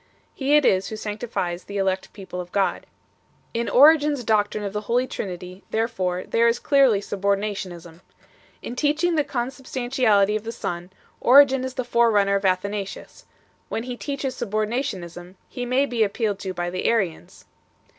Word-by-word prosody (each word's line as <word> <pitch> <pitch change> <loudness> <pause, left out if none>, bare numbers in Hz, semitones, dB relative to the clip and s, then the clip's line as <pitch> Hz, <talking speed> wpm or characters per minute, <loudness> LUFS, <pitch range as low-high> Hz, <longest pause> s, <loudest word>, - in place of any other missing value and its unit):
He 280 +2 +1
it 300 - +4
is 190 +1 +3
Who 220 - -5
sanctifies 210 -5 -4
the 200 - -6
elect 190 -1 -1
people 190 -3 -7
of 175 0 -11
God. 200 -1 0 0.7
In 235 0 -1
Origen 300 +2 +6
s 265 -4 -4
doctrine 210 -1 +1
of 200 -1 -4
the 210 - -2
Holy 245 +2 +2
Trinity 180 -4 -6
therefore 190 -6 -1
there 230 0 +2
is 235 +1 +2
clearly 265 -7 +3
subordinationism. 195 -4 -3 0.6
In 240 - -6
teaching 305 +5 +1
the 305 -2 +2
consub 260 +1 -5
stantiality 245 -6 +2
of 215 - -2
the 225 - -4
Son, 175 -5 -5 0.3
Origen 270 0 +6
is 260 0 -5
the 255 - -1
forerunner 225 -5 +3
of 200 0 0
Atha 185 +1 +1
nasius; 200 -1 -7 0.4
when 225 - -3
he 250 0 -5
teaches 275 0 -4
subordinationism, 210 -6 -3
he 245 -1 -5
may 260 +3 +2
be 240 -4 -2
appealed 210 -1 0
to 190 - -4
by 175 0 -2
the 185 - -4
Arians. 190 - -1
215 Hz, 165 wpm, -23 LUFS, 195-250 Hz, 0.7 s, Origen